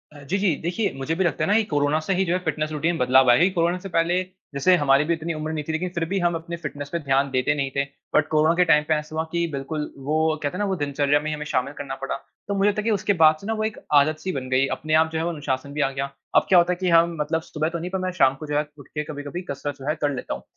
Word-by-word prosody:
अ, - - -11
जी, 190 +8 0
जी। 190 -6 +2
देखिए 190 +4 -1
मुझे 135 +5 -2
भी 190 - +1
लगता 170 - 0
है - - +1
ना - - +4
कि 225 - +3
कोरोना 145 -2 +1
से 195 - +2
ही 190 +1 +2
जो 175 - 0
है 180 - +1
फ़िटनेस 155 0 -1
रूटीन 160 +3 0
बदलाव 130 0 +4
आया 120 - +5
है। 185 - +5
कोरोना 175 0 +1
से 195 - -8
पहले 175 +1 +2 0.3
जैसे 140 +7 +4
हमारी 140 -3 +3
भी - - +4
इतनी 165 0 -3
उम्र 155 0 -4
नहीं 155 -1 -3
थी - - -1
लेकिन 165 +3 -2
फ़िर 170 -1 0
भी 195 +4 -1
हम 175 -1 +1
अपने 165 +1 -5
फ़िटनेस 145 -1 -5
पे 170 - 0
ध्यान 140 -1 +1
देते 130 +2 +1
नहीं 140 -2 -1
थे 140 - +2 0.3
बट 155 0 +4
कोरोना 155 +1 +3
के 180 +1 +4
टाइम 150 -2 +4
पे 160 - +3
ऐसा 150 0 -3
हुआ 160 - 0
कि 170 0 0
बिल्कुल 150 +2 -4 0.2
वो 155 +1 +1 0.3
कहते 145 +5 -2
हैं - - -5
ना 205 - +1
वो 190 - 0
दिनचर्या 145 -2 +1
में 150 - -5
ही 155 - -1
हमें 150 0 -6
शामिल 140 -1 -1
करना 140 -2 -6
पड़ा। 135 - -2 0.3
तो 200 - -1
मुझे 200 +1 +3
लगता 205 - -2
है - - -9
कि 225 - +1
उसके 205 0 +1
बाद 155 0 +7
से 200 - -8
ना 225 - 0
वो 215 -1 -2
एक 220 0 -2 0.2
आदत-सी 155 +5 +3
बन 130 -1 -4
गई 130 +1 +3
अपने 155 0 -4
आप 160 - +1
जो 160 - -2
है - - -1
वो - - 0
अनुशासन 140 -3 -3
भी 150 - -1
आ 135 - +2
गया। 135 0 -3 0.3
अब - - +5
क्या 185 - +6
होता 175 +1 +2
है - - -6
कि 185 - +1
हम 170 0 +4
मतलब 160 +2 0
सुबह 155 0 -3
तो 170 0 -4
नहीं 175 +2 -4
पर 190 - -1
मैं 185 0 -2
शाम 130 -5 +4
को 155 - -7
जो 145 0 0
है 150 - +1
उठ 140 - -13
के 150 - -4
कभी-कभी 145 +3 -6
कसरत 140 0 -4
जो 135 - -10
है 155 - +1
कर 145 -1 +2
लेता 125 - -4
हूँ। - - -7
155 Hz, 320 wpm, -24 LUFS, 145-175 Hz, 0.3 s, बाद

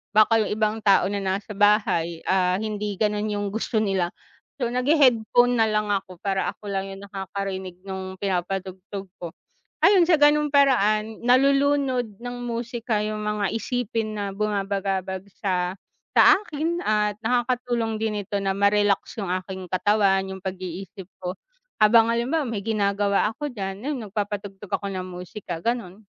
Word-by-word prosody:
baka 220 +1 +6
yung - - -4
ibang 215 0 0
tao 195 -2 +4
na 205 - -1
nasa 195 +2 -2
bahay, 200 -6 +2
ah, 180 -1 +2
hindi 210 -1 -3
ganun 210 0 0
yung 205 -1 -2
gusto 220 +1 -2
nila. 190 -4 0 0.5
So 240 - +1
naghe-headphone 245 -2 +3
na 225 - +5
lang 210 -1 0
ako 185 -3 -3
para 195 -1 0
ako 205 - -10
lang 195 0 -2
yung 195 - -10
nakakarinig 190 -2 -5
nung 190 -1 -6
pinapatugtog 190 +1 -3
ko. 170 -2 -6 0.5
Ayon 385 -3 +6
sa 345 - +6
ganung 295 0 +5
paraan, 220 -6 +3
nalulunod 265 -3 +2
ng 245 0 -5
musika 235 -2 -2
yung 215 0 -3
mga 210 -2 0
isipin 225 -2 -2
na 200 -1 -2
bumabagabag 195 -2 -2 0.2
sa 180 -2 0 0.4
sa - - +8 0.2
akin 330 -2 -2
at 210 -1 +1
nakakatulong 240 -2 0
din 210 -2 -1
ito 200 +1 -3
na 195 -1 0
ma-relax 200 0 +2
yung 195 -3 -3
aking 185 0 -5
katawan, 195 0 +3
yung 190 0 -6
pag-iisip 185 0 -7
ko. 180 0 -4 0.5
Habang 225 +1 +6
halimbawa 265 +7 0
may 225 -4 -3
ginagawa 200 -2 +1
ako 295 +5 -4
diyan 195 -3 -5
ayon 290 +1 -2
nagpapatugtog 205 -1 -5
ako 200 - -1
ng 185 -1 -3
musika 180 0 -7
ganun. 215 -1 -3
205 Hz, 150 wpm, -24 LUFS, 195-230 Hz, 0.5 s, sa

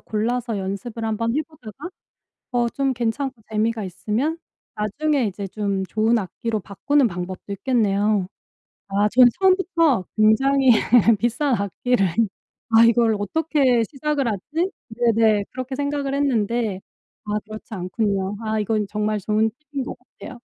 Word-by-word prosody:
골라서 230 +1 -2
연습을 200 +4 -5
한번 230 +2 -1
해 310 - +1
보다가 300 - -11 0.6
어 240 -1 +2
좀 270 +2 -1
괜찮고 240 +1 -2
재미가 220 +1 0
있으면 215 - -2 0.4
나중에 275 +7 0
이제 200 0 -4
좀 200 -1 -2
좋은 220 +4 +2
악기로 215 +2 -3
바꾸는 260 +8 +1
방법도 180 +1 -6
있겠네요. 205 -3 +1 0.6
아 200 +2 +2
저는 250 +1 +7
처음부터 340 - +3
굉장히 265 +5 +4 0.5
비싼 245 +5 +1
악기를 200 +2 0 0.6
'아 225 0 +6
이걸 230 -1 +4
어떻게 265 - +2
시작을 290 -1 -1
하지?' 295 - -2 0.2
네네. 225 -3 +2
그렇게 255 +1 -5
생각을 285 0 -2
했는데 230 -7 0 0.4
아 210 - -6
그렇지 215 +1 -10
않군요. 195 +1 -1
아 220 0 -1
이건 215 0 0
정말 210 0 -1
좋은 215 +3 +1 0.2
팁인 280 -2 -2
것 - - -6
같아요. 250 0 -12
225 Hz, 295 characters per minute, -22 LUFS, 210-265 Hz, 0.6 s, 저는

